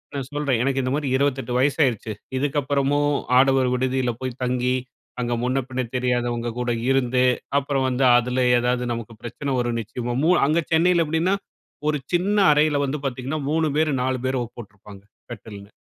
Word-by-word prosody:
நான் 135 Hz, -2 st, -4 dB
சொல்றேன், 145 Hz, -5 st, 0 dB
எனக்கு 135 Hz, 0 st, 0 dB
இந்த 130 Hz, -, -1 dB
மாதிரி 145 Hz, -2 st, -2 dB
28 135 Hz, -2 st, -1 dB
வயசாயிருச்சு 130 Hz, -5 st, +1 dB, 0.3 s
இதுக்கப்புறமும் 145 Hz, +1 st, +1 dB, 0.3 s
ஆடவர் 135 Hz, -1 st, +4 dB
விடுதியில 130 Hz, -1 st, 0 dB
போய் 130 Hz, -1 st, -5 dB
தங்கி, 125 Hz, 0 st, 0 dB, 0.5 s
அங்க 120 Hz, 0 st, -1 dB
முன்னபின்ன 130 Hz, 0 st, -1 dB
தெரியாதவங்க 120 Hz, -1 st, -1 dB
கூட 125 Hz, 0 st, -1 dB, 0.2 s
இருந்து, 130 Hz, -1 st, +2 dB, 0.4 s
அப்புறம் 135 Hz, -1 st, -1 dB
வந்து 130 Hz, +1 st, +1 dB
அதில 125 Hz, +1 st, 0 dB
ஏதாது 125 Hz, +1 st, 0 dB
நமக்கு 115 Hz, -1 st, -7 dB
பிரச்சனை 135 Hz, +4 st, -4 dB
வரும் 120 Hz, -1 st, -1 dB
நிச்சயமா! 120 Hz, +2 st, -4 dB
மூ 170 Hz, -, +4 dB, 0.2 s
அங்க 160 Hz, +3 st, +2 dB
சென்னையில 170 Hz, 0 st, +3 dB
எப்டின்னா, 160 Hz, +5 st, +1 dB, 0.5 s
ஒரு 150 Hz, -, +1 dB, 0.2 s
சின்ன 195 Hz, +4 st, +1 dB, 0.2 s
அறையில 150 Hz, -1 st, +2 dB
வந்து 140 Hz, +2 st, -3 dB
பார்த்தீங்கன்னா 135 Hz, +4 st, -3 dB
3 160 Hz, 0 st, +1 dB
பேர், 155 Hz, 0 st, +2 dB
4 130 Hz, 0 st, -1 dB
பேரோ, 130 Hz, -1 st, 0 dB, 0.2 s
போட்ருப்பாங்க 105 Hz, -3 st, -12 dB, 0.3 s
கட்டில்னு. 105 Hz, -3 st, -10 dB
130 Hz, 150 wpm, -23 LUFS, 125-145 Hz, 0.5 s, ஆடவர்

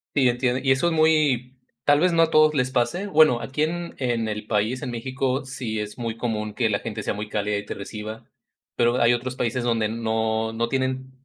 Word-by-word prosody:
Sí, 135 Hz, -3 st, +4 dB
entiendo, 125 Hz, +1 st, +1 dB
y 135 Hz, -, +3 dB
eso 135 Hz, +6 st, +3 dB
es 170 Hz, -, +1 dB
muy 150 Hz, -6 st, +2 dB, 0.3 s
tal 145 Hz, 0 st, +5 dB
vez, 180 Hz, +2 st, +3 dB
no 165 Hz, 0 st, +5 dB
a 165 Hz, -, 0 dB
todos 155 Hz, 0 st, +5 dB
les 130 Hz, -1 st, +1 dB
pase. 155 Hz, +11 st, 0 dB
Bueno, 155 Hz, -10 st, +4 dB
aquí 135 Hz, +3 st, -4 dB
en 170 Hz, +2 st, -2 dB
en 120 Hz, -3 st, 0 dB
el 105 Hz, 0 st, -5 dB
país, 110 Hz, +4 st, 0 dB
en -, -, -4 dB
México, 130 Hz, +3 st, -2 dB
sí 125 Hz, -4 st, -4 dB
es 105 Hz, +3 st, -6 dB
muy 115 Hz, -1 st, -3 dB
común 110 Hz, -3 st, -3 dB
que 120 Hz, -, +1 dB
la 100 Hz, -1 st, 0 dB
gente 115 Hz, -2 st, -5 dB
sea -, -, -1 dB
muy 105 Hz, +1 st, -6 dB
cálida 105 Hz, 0 st, -1 dB
y 100 Hz, -, -5 dB
te -, -, -5 dB
reciba, 105 Hz, +2 st, -7 dB, 0.5 s
pero, 120 Hz, +1 st, +2 dB
hay 115 Hz, +1 st, +5 dB
otros 125 Hz, +1 st, -3 dB
países 125 Hz, 0 st, -1 dB
donde 115 Hz, -2 st, +1 dB
no 110 Hz, 0 st, -1 dB
no 115 Hz, +1 st, -1 dB
tienen 130 Hz, 0 st, -2 dB
125 Hz, 225 wpm, -24 LUFS, 110-135 Hz, 0.5 s, tal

